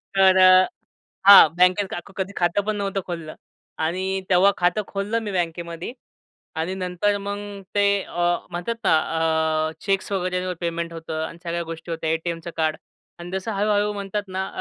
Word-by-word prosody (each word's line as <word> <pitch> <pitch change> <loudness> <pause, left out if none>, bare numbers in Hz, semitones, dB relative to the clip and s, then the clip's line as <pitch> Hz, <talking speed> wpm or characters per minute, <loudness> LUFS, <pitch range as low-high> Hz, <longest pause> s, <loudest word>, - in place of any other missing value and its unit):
तर 190 -1 +5
अ, 185 0 +7 0.6
हा 200 -4 +11
बँकेत 180 +3 +4
का - - -4 0.2
कधी 190 +1 -3
खातं 175 +3 +1
पण 215 0 -1
नव्हतं 200 -1 -2
खोललं. 165 -3 -6 0.4
आणि 185 +4 -1
तेव्हा 190 +2 +5
खातं 180 +4 +1
खोललं 205 +3 -2
मी 210 - -4
बँकेमध्ये. 170 +2 -3 0.6
आणि 165 +4 -2
नंतर 185 +2 -1
मग 200 0 -4 0.4
ते 200 -1 +3
अ, 175 0 0
म्हणतात 175 +7 -3
ना 160 - +5 0.7
अ, 160 - -6
चेक्स 195 0 -1
वगैरे 185 -1 -1
वर 180 - -2
पेमेंट 170 0 -3
होतं. 160 -1 -5
आणि 165 - -11
सगळ्या 170 0 -2
गोष्टी 165 0 -8
होत्या 160 -1 -2
एटीएमचं 165 +1 -3
कार्ड 155 -1 0 0.4
आणि 175 +1 -8
जसं 190 +4 -3
हळूहळू 205 +1 +1
म्हणतात 200 0 -3
ना 190 +1 -3
185 Hz, 165 wpm, -23 LUFS, 170-200 Hz, 0.7 s, हा